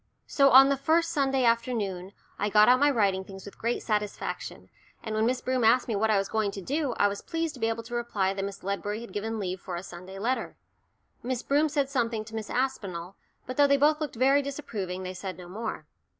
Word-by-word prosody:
So 275 -1 +4
on 270 +1 +8
the 275 - +2
first 330 +5 +2
Sunday 270 -4 +1
afternoon 220 -6 0 0.3
I 205 - 0
got 210 +1 +6
out 250 +1 +6
my 290 +1 +5
writing 200 -7 +1
things 190 0 -11
with 200 - -12
great 235 +2 -1
satisfaction, 210 -2 -3 0.3
and 220 - -4
when 215 +1 +2
Miss 250 0 0
Broom 255 -1 0
asked 235 +3 +4
me 225 - -1
what 220 +2 +1
I 215 - +4
was 195 0 0
going 220 -2 0
to - - -5
do, 280 - -1
I 205 - +3
was 200 0 -4
pleased 330 -1 -3
to 260 - -12
be 225 0 +1
able 225 0 -3
to 235 +1 -10
reply 210 -5 0
that 195 0 -4
Miss 200 0 -6
Ledbury 205 +3 -3
had 235 - -10
given 220 +2 -3
leave 185 -2 -4
for 180 - -5
a 175 - -5
Sunday 185 +1 -10
letter. 245 +6 -2 0.6
Miss 250 -1 -3
Broom 295 +2 +2
said 285 -2 0
something 235 -5 -1
to 220 - -12
Miss 220 -1 -5
Aspinall, 195 -9 -3 0.3
but 255 - -6
though 285 -1 +6
they 280 0 +4
both 300 +2 +3
looked 295 -5 -3
very 270 +4 +4
disapproving, 210 -10 -5
they 185 0 -5
said 185 -1 -6
no 180 -1 -10
more. 210 -3 -5
225 Hz, 235 wpm, -28 LUFS, 200-265 Hz, 0.6 s, on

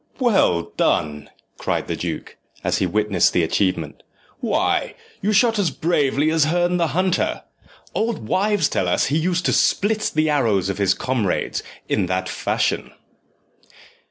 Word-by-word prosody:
"Well 190 - +2
done!" 75 -1 0 0.3
cried - - -1
the - - -3
duke, - - -5 0.3
as - - 0
he 95 - +1
witnessed 105 -1 +2
the 90 - +2
achievement; 95 +3 -1 0.4
"why, - - 0 0.3
you 210 - +1
shoot 225 +1 +3
as 190 -5 +2
bravely 150 -1 +1
as 160 -2 +3
Herne 175 +2 +1
the 170 -1 +1
Hunter. 185 -1 0 0.5
Old 220 - -2
wives 200 - +2
tell 90 - -1
us 90 - +2
he - - +3
used 180 +2 0
to - - +2
split 215 +2 +1
the 155 0 +2
arrows 115 -11 +1
of 100 0 -3
his 100 -1 +3
comrades 120 -8 -1 0.3
in 90 - 0
that 95 0 -1
fashion." - - -1
150 Hz, 150 wpm, -21 LUFS, -, 0.5 s, shoot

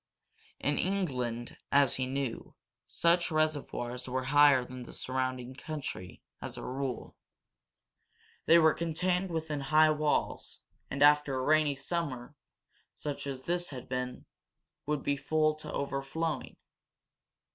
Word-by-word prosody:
In 145 +1 0
England, 125 -12 -1
as 140 -2 +4
he 130 -1 -1
knew, 135 -3 -4 0.3
such 170 +1 +2
reservoirs 145 -6 -1
were 130 +1 -1
higher 145 -3 +6
than 125 0 -8
the 120 - -10
surrounding 130 -1 -2
country, 135 - -6 0.2
as - - -6
a - - -6
rule. 130 -1 -4 1.3
They 170 - +8
were 160 -2 +6
contained 180 +3 0
within 160 -3 -2
high 155 +3 +5
walls, 150 -1 -1 0.3
and, 140 +1 +1
after 145 -2 +5
a 130 - -1
rainy 155 0 +3
summer, 140 -3 -3 0.6
such 145 -1 -5
as 130 -1 -5
this 175 +3 -1
had 130 -4 -8
been, 125 -1 -4 0.6
would 150 -2 -1
be 140 - +1
full 155 +2 +2
to 155 - -7
overflowing. 140 +3 -3
145 Hz, 125 wpm, -31 LUFS, 130-155 Hz, 1.3 s, They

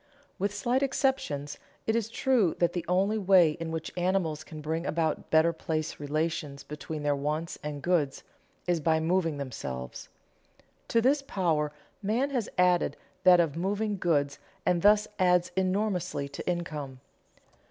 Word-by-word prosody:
With 200 +1 0
slight 240 +6 0
exceptions, 265 - -1 0.3
it 220 - +1
is 225 -1 0
true 230 -7 +2
that 175 -1 +2
the 175 - -2
only 195 +5 +2
way 185 -5 +6
in 165 +1 -5
which 160 -1 -4
animals 175 -4 0
can 155 -1 -9
bring 160 +2 -2
about 160 -2 -1
better 160 +1 +4
place 155 -1 -3
relations 150 -1 -2
between 150 0 -6
their 145 -1 +2
wants 150 +4 -3
and 150 -1 -5
goods 160 -6 +1 0.4
is 175 -2 +1
by 160 +1 +2
moving 165 -1 +1
themselves. 65 - -6 0.8
To 230 - +3
this 275 +4 +3
power 165 - 0 0.3
man 235 +8 0
has 245 -6 -1
added 180 -1 +3 0.3
that 180 -1 +8
of 160 -4 +2
moving 205 +4 -1
goods 145 -5 +1 0.3
and 175 -1 +2
thus 210 +2 +5
adds 180 -1 +3
enormously 185 -5 0
to 140 - -5
income. 150 -7 -4
170 Hz, 150 wpm, -29 LUFS, 150-195 Hz, 0.8 s, that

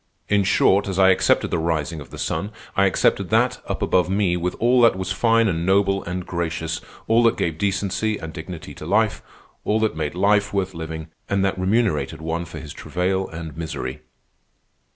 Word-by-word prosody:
In 100 -1 +3
short, 95 +1 +3
as 95 -2 -3
I 95 0 +6
accepted 95 - +2
the 85 - +1
rising 80 -1 -1
of 70 - -11
the - - -10
sun, 95 +7 -2 0.2
I 100 - +4
accepted 95 - +1
that - - +2
up - - -2
above 90 0 +2
me 95 -2 +1
was 90 +1 -2
all 120 +2 +3
that 115 -4 +6
was 95 0 -4
fine 115 +3 +3
and 85 -4 -1
noble 100 +1 +2
and 90 0 -4
gracious, 80 -2 -3 0.3
all 115 +1 +4
that 115 -1 +3
gave 80 -1 -2
decency 100 +2 0
and 80 0 -8
dignity 80 0 -8
to - - -9
life, - - +2 0.4
all 110 +1 +1
that 110 -5 +1
made 80 0 -3
life 100 +2 +2
worth 95 -1 -1
living 80 -1 -6 0.2
and 100 0 +1
that 95 - 0
remunerated 95 - +1
one 80 +2 -3
for 85 - -9
his 75 - -9
travail 95 +1 -1
and 80 -2 -8
misery." 80 -5 -5
95 Hz, 195 wpm, -22 LUFS, 80-100 Hz, 0.4 s, I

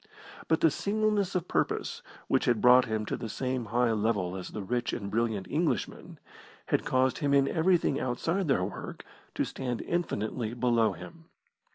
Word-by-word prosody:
But 160 - +2
the 165 - +5
singleness 205 +1 0
of 180 -1 -1
purpose - - -1 0.3
which - - +2
had 120 -3 +2
brought 125 +2 +6
him 110 -2 -2
to - - -2
the 115 - -6
same 125 +2 -2
high 120 +2 +1
level 105 -4 0
as 95 -1 -6
the 105 - -6
rich 120 +4 -1
and 100 -4 -4
brilliant 110 -3 0
Englishman, 160 +2 -2 0.5
had - - +2
caused 130 0 +1
him 140 -1 +2
in 140 -1 +4
everything 165 -2 +2
outside 165 +9 -1
their 135 -10 +2
work 95 - -6 0.3
to - - 0
stand 125 -3 -4
infinitely 120 -8 -2
below 115 -4 +2
him. 90 - -12
125 Hz, 170 wpm, -29 LUFS, 110-160 Hz, 0.5 s, brought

